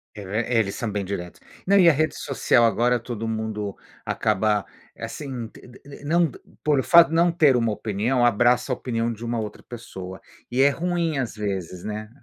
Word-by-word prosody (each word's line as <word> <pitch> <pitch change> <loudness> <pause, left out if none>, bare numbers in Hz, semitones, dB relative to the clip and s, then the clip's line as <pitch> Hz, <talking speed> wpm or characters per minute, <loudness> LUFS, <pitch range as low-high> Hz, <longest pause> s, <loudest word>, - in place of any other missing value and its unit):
É, 105 - -8
ver 110 +6 -2
eles 110 -5 +1
são 115 -3 -3
bem 100 -1 -2
diretos. 90 -3 -6 0.2
Não, 200 +1 +4
e 175 -3 +7
a - - +7
rede 155 +2 0
social, 135 -3 +2
agora 120 +3 +2
todo 115 -1 -5
mundo 110 -2 -3 0.3
acaba, 105 0 +1 0.4
assim, 130 -6 -6
te - - -16
de 125 - -15
de 140 0 -13
não 170 +3 +3
d - - -13 0.2
por 150 -2 +2
o - - 0
fato 170 -1 +7
de 165 - -2
não 170 +1 +4
ter 155 -6 +4
uma 115 -2 +1
opinião, 110 +5 -1
abraça 120 +3 +3
a - - +1
opinião 115 -2 -2
de 115 +1 -7
uma 120 0 -2
outra 105 -1 -6
pessoa 95 -6 -9 0.3
e 125 +2 +2
é 140 - +6
ruim, 170 0 -1
às 125 -4 -3
vezes, 95 -4 -4
né. 105 0 -5
120 Hz, 205 wpm, -24 LUFS, 105-140 Hz, 0.4 s, e